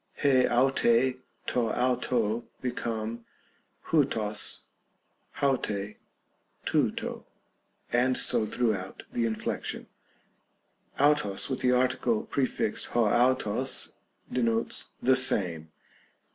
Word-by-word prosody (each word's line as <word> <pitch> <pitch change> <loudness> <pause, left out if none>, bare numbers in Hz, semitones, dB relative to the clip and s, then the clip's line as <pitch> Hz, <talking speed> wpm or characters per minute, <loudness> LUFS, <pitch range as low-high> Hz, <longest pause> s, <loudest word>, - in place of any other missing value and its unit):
rj 130 -3 +4
avnj, 125 0 +3 0.3
to 120 -2 0
avro, 120 -2 0
become 115 -2 -3 0.7
ovrog, 110 -9 +1 0.7
auT77, 105 -8 -1 0.7
Tovro, - - -1 0.7
and 125 +1 +3
so 110 - +3
throughout 105 -5 -2
the 115 -1 +1
inflection, 110 -1 -3 1.1
avros 145 -9 +2
with 130 - -1
the 125 - +2
article 130 - +1
prefixed 135 - -1
(6 - - -13
avros) 120 +1 +2 0.4
denotes 115 -2 +1
" - - -25
the 130 +2 +5
same." 85 -11 0
120 Hz, 90 wpm, -28 LUFS, 110-130 Hz, 1.1 s, the